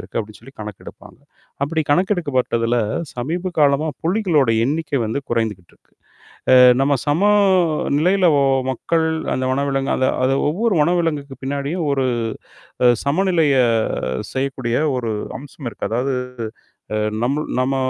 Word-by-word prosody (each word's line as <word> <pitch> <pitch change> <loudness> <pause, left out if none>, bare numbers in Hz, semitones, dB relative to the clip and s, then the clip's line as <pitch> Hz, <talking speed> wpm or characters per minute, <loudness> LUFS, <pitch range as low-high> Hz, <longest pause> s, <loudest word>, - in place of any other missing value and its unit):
இருக்கு - - -6
அப்பிடி 110 -1 -5
சொல்லி 135 +4 -15
கணக்கெடுப்பாங்க. 105 -2 -10 0.4
அப்பிடி 160 +3 0
கணக்கெடுக்கப்பட்டதுல 145 - +1 0.4
சமீப 170 +9 -3
காலமா 145 +1 +3 0.2
புலிகளோட 170 - +2
எண்ணிக்கை 145 0 -1
வந்து 110 +5 -2
குறைந்துக்கிட்டு 110 -7 -2
இருக்கு. - - -36 0.6
அ - - +8 0.3
நம்ம 140 +1 +3
சம 145 +5 +1 0.8
நிலையில 185 +3 +3 0.4
மக்கள். 160 +5 0 0.3
அந்த 130 - -2
வனவிலங்கு 135 0 0
அந்த 130 - +2 0.2
அது 135 +1 +2
ஒவ்வொரு 210 +6 0
வனவிலங்குக்கு 150 -5 0
பின்னாடியும் 140 +5 -2
ஒரு 135 -2 +1 0.8
அ - - +7 0.2
சமநிலைய 160 -2 +2 0.8
செய்யக்கூடிய 130 -3 -1 0.2
ஒரு 115 -3 -2 0.3
அம்சம் 140 -1 -9
இருக்கு. - - -5
அதாவது 130 +4 0 0.8
அ - - 0 0.3
நம்முள் 145 +4 -1
நம்ம 135 +1 0
140 Hz, 120 wpm, -20 LUFS, 130-165 Hz, 0.8 s, அ